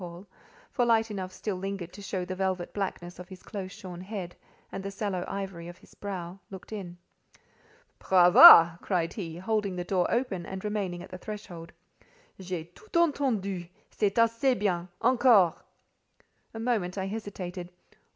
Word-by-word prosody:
Paul, 175 +2 -9 0.5
for 245 - +1
light 225 -2 +2
enough 190 -2 -5
still 195 0 -4
lingered 190 -2 -5
to 205 - -10
show 190 -2 -3
the 185 - -5
velvet 185 -1 -2
blackness 180 -3 -4
of 180 - -10
his 185 -1 -12
close 190 -2 -6
shorn 180 -3 -9
head, 185 -3 -6 0.4
and 195 - -5
the 195 - -4
sallow 195 -2 -3
ivory 195 -4 -5
of 175 0 -10
his - - -20
brow) 185 -2 -6
looked 190 +1 -11
in. 180 -4 -7 1.0
"Brava!" 175 -2 +9
cried 175 -4 -1
he, 165 -6 -6
holding 200 0 -1
the 180 - -3
door 180 0 0
open 235 -8 -1
and 190 +2 -7
remaining 195 -4 -3
at - - -13
the 185 - -8
threshold. 180 -5 -8 0.7
"J'ai 180 -3 -4
tout 435 - -20
entendu. 235 - +1 0.2
C'est 205 -1 -1
assez 230 +3 +3
bien. 180 -4 -1
Encore!" 235 - +5 1.0
A - - -5
moment 220 -6 -1
I 190 - -2
hesitated. 195 -4 -6
190 Hz, 160 wpm, -28 LUFS, 180-210 Hz, 1.0 s, Brava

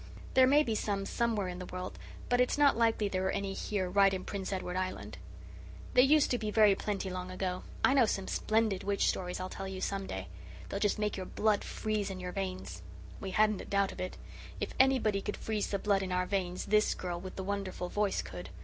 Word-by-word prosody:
There 260 0 +7
may 290 +3 +5
be 230 - -1
some 200 -2 -1
somewhere 220 -3 0
in 180 0 -5
the 180 - -6
world, 185 0 -6 0.3
but 245 0 +3
it's 250 - +2
not 290 -1 +5
likely 225 -2 +2
there 190 -1 -1
are - - +1
any 195 0 -2
here 195 -2 -2
right 195 +1 +5
in 185 -1 -3
Prince 195 -1 -4
Edward 185 -2 -3
Island. 185 - -4 0.7
They 250 - +7
used 290 +3 +5
to 245 - +1
be 215 - -2
very 210 -1 +6
plenty 195 -1 -2
long 180 0 -4
ago. 185 0 -3 0.2
I 265 - +4
know 260 -5 +5
some 195 -2 -1
splendid 215 -3 +1
witch 200 0 +1
stories 180 -1 -2
I'll 185 - -3
tell 195 +1 -6
you 190 -1 -5
some 195 0 -2
day. 95 -2 -5 0.4
They'll 200 - -2
just 205 0 +1
make 210 -1 -1
your 185 -1 -5
blood 210 -1 +1
freeze 215 -2 -2
in 190 -1 -5
your 180 0 -4
veins." 185 - -4 0.4
We 195 - -5
hadn't 215 +1 +2
a - - -8
doubt 200 -1 +1
of - - -7
it. 185 - -4 0.4
If - - -3
anybody 250 -7 +4
could 205 - -4
freeze 215 -2 -2
the 200 - -1
blood 200 0 +1
in 190 -1 -3
our 180 0 +1
veins 185 -2 -2
this 210 +1 +3
girl 175 -1 -4
with 185 0 -8
the 190 - -4
wonderful 195 -2 -3
voice 205 +1 0
could. 90 0 -8
195 Hz, 230 wpm, -32 LUFS, 185-215 Hz, 0.7 s, There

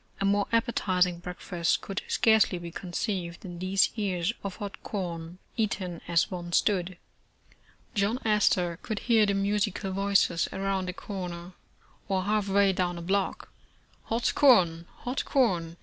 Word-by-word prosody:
A 195 - 0
more 200 0 +2
appetizing 185 -7 +1
breakfast 175 -1 -1
could 195 0 -4
scarcely 220 -4 +3
be 170 -1 -7
conceived 175 0 -4
than 175 -3 -8
these 190 +2 +2
ears 195 -2 -1
of 195 -2 -4
hot 200 -1 -7
corn, 170 -3 -5 0.2
eaten 190 -6 -2
as 170 -1 +2
one 175 -1 -5
stood. 185 -2 +1 1.0
John 205 +4 +1
Astor 180 -5 +2
could 215 - -4
hear 220 -1 +3
the 200 - +1
musical 195 -1 0
voices 195 -3 +2
around 195 -1 -1
a - - -3
corner, 180 -3 -6 0.5
or 190 -1 0
half 210 0 0
way 200 0 +4
down 180 -1 -1
a - - -6
block, 195 +2 -1 0.2
' - - -35
' - - -33
Hot 230 +1 0
corn, 175 - +4
hot 250 +2 -2
corn 175 -11 +1
190 Hz, 150 wpm, -28 LUFS, 175-205 Hz, 1.0 s, way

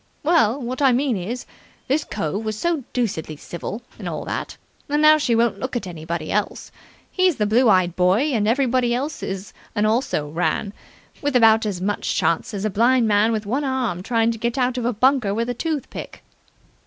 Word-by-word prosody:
Well, 290 -6 +3
what 255 +1 -4
I 270 -2 +5
mean 260 -1 +1
is, 210 +7 -4 0.4
this 290 +3 +1
cove 195 +8 -3
was 215 -1 -3
so 335 0 -1
deucedly 185 -11 -2
civil, 200 +9 -7 0.2
and - - -4
all - - -5
that, - - -4 0.3
that 295 +1 0
now 305 0 +6
she 245 -5 +1
won't 230 0 +1
look 260 0 -4
at 240 - -2
anybody 165 -2 -5
else. 210 0 -2 0.4
He's 370 -3 +2
the 210 - 0
blue 230 +3 +4
eyed 185 -3 +3
boy, 190 +11 +2
and 210 -3 +1
everybody 245 0 +2
else 285 +5 -3
is 190 +1 -5 0.2
an 210 0 +2
also 215 - 0
ran, 175 +6 -1 0.5
with 285 -2 -1
about 225 -2 +5
as 185 -4 -3
much 205 +2 -1
chance 165 - 0
as 205 -1 -4
a - - +1
blind 235 +3 +3
man 210 +1 +3
with 215 -2 -2
one 260 +8 -1
arm 255 -10 -1
trying 230 +3 +1
to 225 - -6
get 235 +3 -2
out 250 -1 +1
of 235 - -3
a 245 - +2
bunker 245 -3 +2
with 230 +2 -1
a - - -2
tooth 310 +2 -3
pick." - - -8
230 Hz, 205 wpm, -22 LUFS, 205-260 Hz, 0.5 s, now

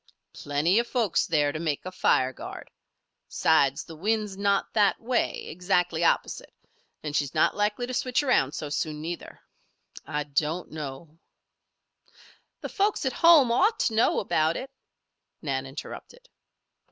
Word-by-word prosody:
"Plenty 150 +8 +1
of 235 - -1
folks 225 -10 +1
there 150 -3 +2
to 155 - -5
make 155 -2 -2
a 185 - -5
fire 130 -8 +2
guard. - - -9 0.6
Besides, 140 -4 +2
the 165 - -11
wind's 210 +3 -1
not 200 0 0
that 210 -3 +3
way, 240 +1 -1
exactly 180 -1 0
opposite. - - 0 0.5
And 150 -1 -4
she's 145 -3 -1
not 155 - +3
likely 210 +4 0
to 255 - -6
switch 255 +2 0
around 155 - +2
so 150 - -5
soon, 150 +1 -2
neither. 170 +3 -7 0.6
I, 150 0 -3
don't, 150 +4 -2
know" 155 +1 -8 1.4
"The - - -5
folks 410 -4 0
at 265 - 0
home 325 -8 +6
ought 395 - +3
to 225 - +1
know 220 - +3
about 160 -4 +1
it," 265 +1 -7 0.7
Nan 135 -3 -2
interrupted. 485 - -10
170 Hz, 145 wpm, -26 LUFS, 150-225 Hz, 1.4 s, home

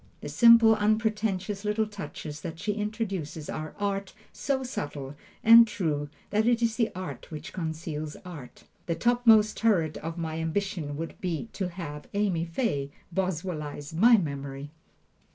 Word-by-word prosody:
The - - -6
simple, 230 -1 +7
unpretentious 210 -2 0
little 210 +1 +1
touches 190 -7 -7
that 165 0 -6
she 210 +5 -1
introduces 200 -8 -4
are 155 0 -5
art 200 -1 -2 0.2
so 270 -2 -1
subtile 145 - -5 0.3
and 230 +1 +9
true 150 -8 -2 0.2
that 215 +2 +2
it 240 -1 +3
is 225 -1 +1
the 230 -2 +1
art 160 -9 -6
which 155 -2 -8
conceals 160 -3 -4
art. 155 -9 -10 0.2
The 170 - 0
topmost 225 +1 +4
turret 180 -9 +2
of 165 +2 -6
my 160 -1 -3
ambition 165 -3 -2
would 165 +1 -6
be 180 +4 -3
to 190 -3 -2
have 160 -5 -7
Amy 190 -5 +1
Fay 165 - -1 0.2
Boswellize 160 -5 -3
my 225 +8 +6
memory. 140 -4 -4
185 Hz, 145 wpm, -28 LUFS, 155-215 Hz, 0.3 s, and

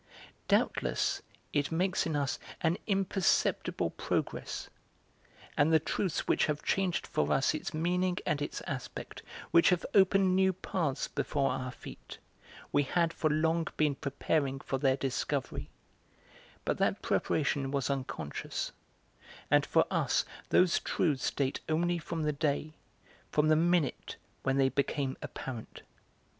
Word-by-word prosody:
Doubtless - - +1 0.3
it 145 +1 +1
makes 180 +2 +1
in 160 - -1
us 140 -1 0 0.2
an 170 +2 +1
imperceptible 195 -2 +1
progress, - - -3 0.9
and 145 +2 +4
the 160 - +7
truths 170 +3 -1
which - - +3
have 150 -1 -2
changed 190 -2 0
for 155 - 0
us 135 - +3
its 155 - -4
meaning 180 +3 0
and 145 - 0
its 145 - -3
aspect, 130 -3 -6 0.3
which 170 - +6
have 180 -1 +1
opened 190 -1 +5
new 190 0 +4
paths 160 -6 -2
before 140 -1 0
our 130 0 -3
feet, - - -10 0.5
we 145 - +4
had 165 +4 +1
for 155 - +1
long 160 +2 +1
been 150 -2 +3
preparing 140 0 -1
for 135 0 -3
their 135 -1 +3
discovery; 135 -2 -2 1.0
but - - 0
that - - +1
preparation 140 -2 +1
was 140 0 0
unconscious; 130 - -4 0.8
and - - +4
for - - +4
us - - +2 0.2
those 180 -2 +4
truths 145 -7 0
date 135 -1 -1
only 175 +2 +1
from 160 0 -4
the 150 0 +1
day, 150 +1 -1 0.6
from 150 +1 +3
the 155 - +6
minute 170 -2 +1 0.3
when 135 0 +1
they 135 -1 +4
became 140 0 -1
apparent. 120 -4 -7
155 Hz, 135 wpm, -31 LUFS, 140-175 Hz, 1.0 s, the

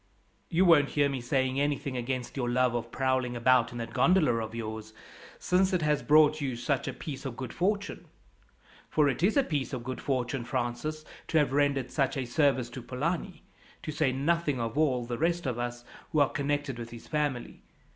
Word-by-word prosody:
"You 180 +3 +3
won't 150 -5 +6
hear 145 -1 +2
me 135 -2 -3
saying 130 +2 0
anything 145 -1 -1
against 125 0 -3
your 125 -3 -1
love 125 0 +2
of 120 -1 -3
prowling 130 -2 0
about 120 0 +3
in 120 - -7
that 115 0 -5
gondola 165 -2 +4
of 110 0 -4
yours, 110 -1 -6 0.4
since 185 +1 +2
it 175 -3 +1
has 150 -1 +2
brought 150 +4 +5
you 135 -3 -2
such 125 +3 -1
a - - -2
piece 140 -5 -7
of 130 -3 -5
good 130 -2 -5
fortune 200 +3 -1 0.8
for 150 -2 +3
it 135 0 -1
is 200 +8 +3
a 280 - +5
piece 145 - -2
of 125 -2 -4
good 130 +1 -5
fortune, 130 -1 -1
Francis, 125 +6 -3 0.2
to 160 - +1
have 145 -3 +2
rendered 140 -2 +1
such 135 -2 0
a 130 - -1
service 125 -1 +1
to 130 - -7
Polani, 165 +9 -3 0.4
to 155 - -4
say 150 -3 +1
nothing 145 +1 0
of 115 0 -3
all 135 -6 +2
the 120 0 -4
rest 170 +1 0
of 125 -3 -2
us 120 0 -4 0.3
who 155 - +2
are 145 - +4
connected 145 -3 -2
with 115 0 -6
his 115 -1 -11
family. 145 -5 -2
135 Hz, 200 wpm, -29 LUFS, 120-150 Hz, 0.8 s, won't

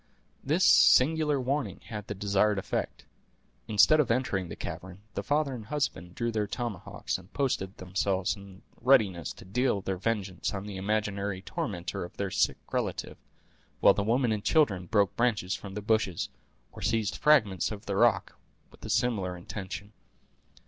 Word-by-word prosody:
This - - +2
singular 150 +1 +5
warning 130 - -2
had 105 -3 -7
the 105 - -4
desired 100 +1 +2
effect. 95 - -3 0.6
Instead 110 +8 +5
of 145 - +2
entering 110 -7 0
the - - -6
cavern, 95 +2 -7
the - - -2
father 145 -1 0
and 110 -4 -7
husband 135 - -3
drew 115 0 -1
their 105 -2 -1
tomahawks, 110 -5 -4
and 90 0 -17
posted 105 -9 -1
themselves 95 0 -1
in 100 -1 -13 0.2
readiness 100 - +3
to - - -14
deal 120 +3 +1
their 95 -1 -3
vengeance 100 -2 -2
on 100 0 -5
the 105 -2 -6
imaginary 100 -1 -2
tormentor 90 -6 -4
of 85 - -10
their 100 -2 -2
sick - - +2
relative, - - -3 0.6
while - - +7
the - - -1
women 120 +3 +2
and 105 -2 -1
children 105 - +2
broke 100 -1 +2
branches 105 -6 +1
from 95 0 -6
the 105 - -4
bushes, 110 -5 0 0.4
or - - -11
seized 110 -3 0
fragments 110 - +3
of 105 -1 -7
the 100 - -2
rock, 115 0 +2 0.3
with - - -18
a - - -6
similar 100 -7 0
intention. 95 +2 -7
100 Hz, 160 wpm, -29 LUFS, 95-120 Hz, 0.6 s, while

